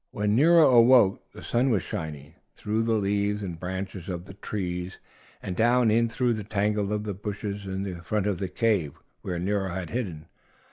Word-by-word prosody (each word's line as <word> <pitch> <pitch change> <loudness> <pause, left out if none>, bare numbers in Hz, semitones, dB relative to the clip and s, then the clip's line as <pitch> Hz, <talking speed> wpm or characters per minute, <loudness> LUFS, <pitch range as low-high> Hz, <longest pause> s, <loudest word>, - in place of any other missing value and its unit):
When 105 0 0
Nero 165 +4 +6
awoke 120 -4 +5
the - - -12
sun 125 +3 +1
was 105 -9 +1
shining 75 -1 -6 0.2
through 110 +2 -1
the 115 0 +1
leaves 105 0 0
and 85 -4 -5
branches 95 0 -5
of 90 -1 -5
the 95 - -11
trees 90 -2 -4 0.5
and 90 - -4
down 120 +2 +3
in 115 +1 +3
through 120 +1 +1
the 110 -2 -4
tangle 105 0 -1
of 105 -2 -3
bushes 100 -1 -5
in 95 -2 -4
front 105 +3 -1
of 100 -4 -1
the 95 - -3
cave 95 - 0 0.3
where 90 -2 -4
Nero 95 +2 -1
had 90 -2 -5
hidden. 90 -11 -4
100 Hz, 180 wpm, -26 LUFS, 95-110 Hz, 0.5 s, Nero